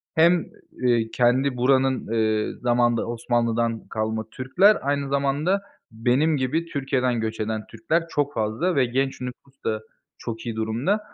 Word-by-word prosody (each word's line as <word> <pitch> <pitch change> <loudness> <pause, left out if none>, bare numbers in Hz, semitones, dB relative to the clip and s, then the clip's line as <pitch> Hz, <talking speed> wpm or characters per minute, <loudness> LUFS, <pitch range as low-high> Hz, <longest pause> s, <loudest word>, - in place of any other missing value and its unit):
Hem, 170 +1 +4 0.3
eee, 120 -2 +2
kendi 125 +2 +2
buranın, 130 +1 +2
eee, 110 -1 +1
zamanında 120 -1 +2
Osmanlı'dan 115 -1 -1
kalma 110 0 -3
Türkler, 185 +11 +4
aynı 140 0 -1
zamanda 140 +8 +1 0.3
benim 125 +7 +2
gibi 135 +6 0
Türkiye'den 130 -6 -1
göç 110 0 -3
eden 110 0 -3
Türkler 165 0 -1
çok 145 -2 -1
fazla 110 +12 0
ve 135 -2 +4
genç 135 +3 -1
nüfus 130 +2 -9
da 110 -1 -1 0.4
çok 115 0 -6
iyi 115 -2 -3
durumda. 115 - 0
125 Hz, 140 wpm, -24 LUFS, 115-140 Hz, 0.4 s, Hem